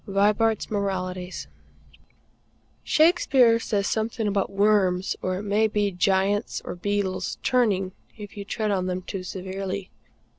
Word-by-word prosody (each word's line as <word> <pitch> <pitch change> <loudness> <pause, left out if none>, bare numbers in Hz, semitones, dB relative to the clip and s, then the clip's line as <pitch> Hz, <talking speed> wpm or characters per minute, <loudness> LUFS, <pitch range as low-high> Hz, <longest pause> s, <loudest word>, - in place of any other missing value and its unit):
Vibart's 210 +3 +2
Moralities. 185 -3 -3 1.4
Shakespeare 275 -8 +4
says 205 -3 -1
something 220 +1 -1
about 200 -1 0
worms, 195 -2 +2
or 185 0 -1
it 200 - -5
may 210 +2 +2
be 205 -1 0
giants 195 +3 +1
or - - -4
beetles, 195 +1 -2
turning 205 -7 +2 0.3
if 205 -2 -9
you 200 - -5
tread 210 +1 -2
on 185 -2 0
them 185 0 -3
too 190 +1 -5
severely. 190 +1 -5
200 Hz, 125 wpm, -25 LUFS, 190-215 Hz, 1.4 s, Shakespeare